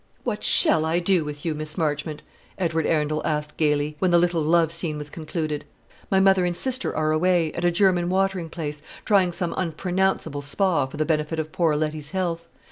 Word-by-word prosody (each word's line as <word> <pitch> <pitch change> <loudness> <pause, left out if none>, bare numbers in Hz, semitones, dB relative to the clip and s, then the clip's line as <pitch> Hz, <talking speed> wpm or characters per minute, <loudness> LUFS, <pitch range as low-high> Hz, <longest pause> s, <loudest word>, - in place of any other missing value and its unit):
"What 220 -4 -3
shall 155 - +5
I 160 +2 +1
do 180 -1 +2
with 150 0 -7
you, 165 - 0
Miss 155 +2 -6
Marchmont?" 150 -1 -2 0.3
Edward 165 -3 0
Arundel 155 -1 0
asked 150 -1 -2
gaily, 150 -1 0
when 185 - +2
the 175 - +5
little 175 -1 +2
love 165 +1 +3
scene 165 -2 -3
was 150 0 -7
concluded. 155 -2 -4 0.5
"My 190 - +3
mother 190 -1 +4
and 175 -1 -1
sister 260 0 -1
are 155 0 +1
away, 165 0 +2
at 175 - -4
a - - +5
German 175 -1 +2
watering 190 -2 0
place, 150 -3 -5 0.2
trying 195 -4 +3
some 175 -1 -2
unpronounceable 180 -3 -1
Spa 145 0 +1
for 140 - -10
the 155 - 0
benefit 155 0 -1
of 155 0 -3
poor 165 -3 +1
Letty's 150 -1 -2
health. 170 -2 -2
165 Hz, 195 wpm, -24 LUFS, 150-180 Hz, 0.5 s, shall